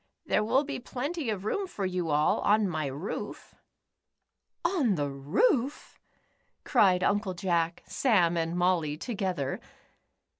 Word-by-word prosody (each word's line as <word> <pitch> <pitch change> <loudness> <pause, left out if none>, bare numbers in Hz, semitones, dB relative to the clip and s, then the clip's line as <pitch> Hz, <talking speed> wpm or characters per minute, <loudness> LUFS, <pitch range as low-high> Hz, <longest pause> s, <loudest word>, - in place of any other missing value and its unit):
There - - +2
will 260 +6 +2
be 285 -2 -5
plenty 280 +3 -4
of 205 -2 -3
room 390 - -1
for 200 - -4
you 180 -3 -2
all 150 0 +2
on 210 0 +3
my 155 -5 -2
roof." 145 +9 -6 1.1
"On 310 - +2
the 145 -3 -1
roof?" 230 - 0 0.6
cried 190 -8 +4
Uncle 200 -2 +1
Jack, 170 -3 0
Sam, 180 -10 +2
and 165 +1 -1
Molly 175 -4 +1
together. 185 - -2
185 Hz, 125 wpm, -29 LUFS, 165-235 Hz, 1.1 s, cried